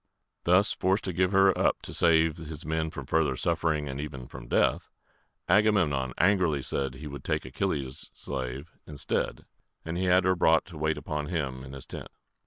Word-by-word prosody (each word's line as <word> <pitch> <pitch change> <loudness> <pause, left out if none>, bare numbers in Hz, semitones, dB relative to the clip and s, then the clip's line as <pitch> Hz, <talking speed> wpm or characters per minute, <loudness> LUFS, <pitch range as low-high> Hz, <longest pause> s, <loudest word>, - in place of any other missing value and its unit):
Thus 95 +4 +4
forced 95 +2 +1
to 95 - -3
give 90 +2 +2
her 95 -1 +5
up - - +1
to - - -6
save 80 -2 +4
his 80 -1 -6
men 80 0 -1
from - - -7
further 80 -5 +1
suffering 80 -1 0
and 70 +1 -4
even 70 -4 -7
from - - -10
death, - - +1 0.6
Agamemnon 90 - +3
angrily 90 -7 +2
said 70 0 -1
he 75 +4 -9
would 70 -1 -7
take - - -1
Achilles' 70 -2 -3
slave 65 +4 -5 0.2
instead, 75 -2 -2 0.4
and 80 +2 -3
he 95 - 0
had 90 +1 +4
her 95 +1 +3
brought 80 -2 +3
to 85 -4 -11
wait 80 +1 0
upon 75 -1 -4
him 70 -7 -3
in 65 0 -10
his 70 -2 -8
tent. - - -8
80 Hz, 185 wpm, -28 LUFS, 70-90 Hz, 0.6 s, her